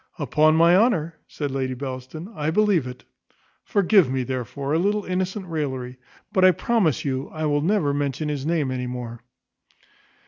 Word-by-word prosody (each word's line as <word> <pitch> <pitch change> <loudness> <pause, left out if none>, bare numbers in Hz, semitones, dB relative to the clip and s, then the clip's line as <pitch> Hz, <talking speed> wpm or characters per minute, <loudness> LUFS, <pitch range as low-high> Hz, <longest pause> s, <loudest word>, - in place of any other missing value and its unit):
"Upon 155 +1 +3
my 170 +2 +5
honour," 180 -7 +2
said 145 -2 -4
Lady 130 -1 -2
Bellaston, 130 - -7
"I 150 -4 -2
believe 185 -5 +2
it. 125 0 -9 0.6
Forgive 195 -5 +3
me, 130 -1 0
therefore, 130 +3 -4
a 160 - +2
little 205 +3 0
innocent 185 +2 -2
raillery; 130 -7 -4 0.4
but 190 -3 +3
I 185 - +9
promise 195 - 0
you 135 0 -2
I 155 -1 -4
will 145 -1 +1
never 165 -4 +1
mention 145 +1 -2
his 145 -3 -3
name 155 -4 0
any 125 -1 -3
more." 120 -2 -6
150 Hz, 165 wpm, -23 LUFS, 130-180 Hz, 0.6 s, I